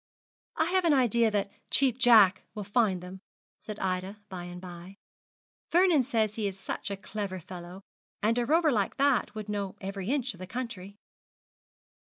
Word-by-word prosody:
'I 320 - +2
have 375 -1 +2
an 315 -3 +5
idea 235 -3 +3
that 200 -1 -1 0.2
Cheap 260 -3 +2
Jack 215 -7 +6
will 210 - -4
find 205 -3 +1
them,' 185 +1 -9 0.4
said 215 -1 -7
Ida 185 +2 -2
by 180 -2 -6
and 175 0 -8
by. 180 +1 -10 0.7
'Vernon 345 -4 +5
says 225 -5 0
he 215 -2 -2
is 195 -1 -6
such - - -4
a 200 - -4
clever 195 -1 -5
fellow; 180 +2 -9 0.4
and 230 +3 +2
a 240 - 0
rover 320 +1 +4
like 205 -6 0
that 275 -6 +2
would 215 -1 -6
know 200 -2 -3
every 195 +1 -5
inch 265 -3 0
of 180 - -16
the 185 - -7
country.' 205 -4 -6
205 Hz, 175 wpm, -29 LUFS, 190-245 Hz, 0.7 s, Jack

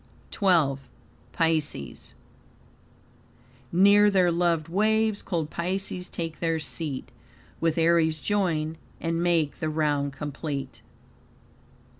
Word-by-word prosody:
XII. 165 -9 +2 0.5
Pisces 155 - -2 1.6
"Near 200 +3 +6
their 185 -3 +3
loved 170 -2 +1
waves 215 +3 +1
cold 160 -4 -3
Pisces 180 +1 -3
take 165 -2 -5
their 165 -1 0
seat, 150 -3 -4 0.5
With 165 -1 0
Aries 165 -1 +3
join, 165 -5 -1 0.2
and 165 0 -1
make 170 -4 +1
the 155 - -1
round 145 -2 0
complete." 140 -1 -5
165 Hz, 95 wpm, -26 LUFS, 155-180 Hz, 1.6 s, Near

